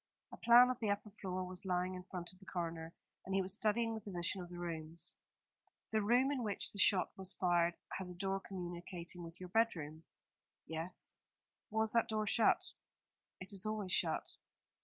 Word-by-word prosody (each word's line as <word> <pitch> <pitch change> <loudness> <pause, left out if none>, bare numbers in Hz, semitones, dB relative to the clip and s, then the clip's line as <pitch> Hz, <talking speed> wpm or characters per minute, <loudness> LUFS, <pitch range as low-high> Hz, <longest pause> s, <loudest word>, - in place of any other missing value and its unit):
A - - -8
plan 240 +2 +8
of 255 - -4
the 220 - 0
upper 205 +1 -1
floor 185 -1 -2
was 180 +1 -6
lying 180 -1 0
in 180 - -5
front 180 -1 -6
of 185 - -20
the 190 - -15
coroner, 165 -2 -3 0.3
and 190 - -2
he 195 - +4
was 185 +1 -1
studying 225 +2 +2
the 220 - -4
position 185 -1 -1
of 175 - -8
the 175 - -8
rooms. 165 -1 -5 0.8
"The 220 -1 +2
room 245 +6 +4
in 275 -3 -1
which 210 -4 -1
the 200 - -8
shot 185 -2 +5
was 190 -1 -1
fired 175 -1 +3 0.2
has 190 -1 -3
a 180 - -7
door 195 +2 -1
communicating 175 -1 -6
with 165 +1 -9
your 180 -1 -7
bedroom?" 165 -8 +1 0.6
"Yes." 160 +3 -3 0.6
"Was 220 0 +1
that 230 0 +3
door 215 -1 0
shut?" 225 +2 +4 0.8
"It 185 +3 -7
is 195 +2 -1
always 210 -4 -2
shut." - - +2
185 Hz, 185 wpm, -37 LUFS, 175-215 Hz, 0.8 s, plan